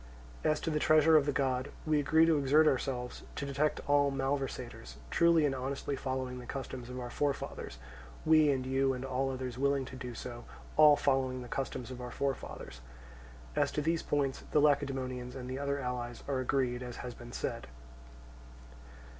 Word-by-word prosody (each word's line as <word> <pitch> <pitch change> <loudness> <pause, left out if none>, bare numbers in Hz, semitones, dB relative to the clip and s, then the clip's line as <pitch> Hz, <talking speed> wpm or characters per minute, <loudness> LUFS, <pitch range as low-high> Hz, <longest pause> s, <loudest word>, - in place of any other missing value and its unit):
As 155 0 +2
to 165 - -1
the 150 - +1
treasure 155 +1 +5
of 150 -2 +5
the - - +3
god, 130 -1 0 0.2
we 155 -1 +3
agree 160 +3 +5
to 160 -2 +3
exert 145 +3 +5
ourselves 125 -2 -1
to 140 - -3
detect 140 +2 0
all 145 -1 +4
malversators, 135 -4 -3 0.2
truly 170 -2 +5
and 140 - +1
honestly 135 +2 -3
following 130 -1 -3
the 125 - -10
customs 130 -2 -6
of 125 0 -5
our 120 -1 -5
forefathers, 140 - -2 0.5
we 155 -1 +6
and 130 -2 +1
you 135 +1 +2
and 130 +1 -5
all 135 +1 0
others 130 -2 -4
willing 140 -1 +2
to 130 - -9
do 125 -2 -6
so, 120 0 -7 0.3
all 150 -1 +8
following 130 -3 +1
the - - -9
customs 130 -1 -4
of 125 -1 -7
our 125 - -5
forefathers. 125 - -4 0.7
As - - +2
to 150 - 0
these 165 +1 +1
points 140 -2 -1
the 150 - +3
Lacedaemonians 135 -4 +1
and 125 -1 -6
the 130 +1 -4
other 140 0 -1
allies 125 -2 -4
are 135 -2 0
agreed 125 -1 0
as 125 -1 -6
has 125 - -5
been 120 0 -11
said. - - -4
135 Hz, 180 wpm, -32 LUFS, 125-145 Hz, 0.7 s, all